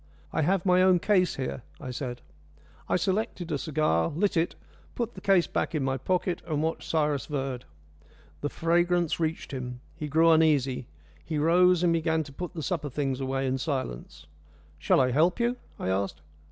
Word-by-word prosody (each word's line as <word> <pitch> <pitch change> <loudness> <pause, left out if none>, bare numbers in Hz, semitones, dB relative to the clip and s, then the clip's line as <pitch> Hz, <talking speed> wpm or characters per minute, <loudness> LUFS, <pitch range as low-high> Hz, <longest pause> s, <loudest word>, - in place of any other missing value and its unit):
"I 160 - +1
have 180 +4 +1
my 180 -1 +5
own 185 -1 +5
case 185 0 +2
here," 130 -1 -4 0.2
I 130 -3 -6
said. 125 -1 -5 0.7
I - - +3
selected 190 -2 -1
a 145 - 0
cigar, 135 - +1
lit 190 +7 0
it, 165 +1 +1 0.4
put 235 -1 -2
the 190 - -10
case 190 -3 +4
back - - -2
in 150 - 0
my 135 0 0
pocket, 180 +5 -1
and 155 -2 -1
watched 160 +1 -3
Cyrus 150 -3 0
Verd. 135 -4 -3 0.7
The 145 - -2
fragrance 175 +1 +1
reached 160 0 -2
him. 125 -2 -5 0.2
He 155 -2 -5
grew 165 +3 +4
uneasy. 145 -6 +3 0.4
He 155 - -3
rose, 175 +3 +4
and 170 -1 +4
began 160 -1 +1
to 140 -2 -12
put 180 +4 -6
the 160 - -4
supper 155 -4 -2
things 135 -1 -2
away 135 0 -1
in 130 0 0
silence. 130 - -4 0.5
"Shall - - +3
I 130 -1 +3
help 165 - +3
you?" 240 +1 +1 0.2
I - - -3
asked. 95 +1 -1
155 Hz, 180 wpm, -28 LUFS, 135-175 Hz, 0.7 s, my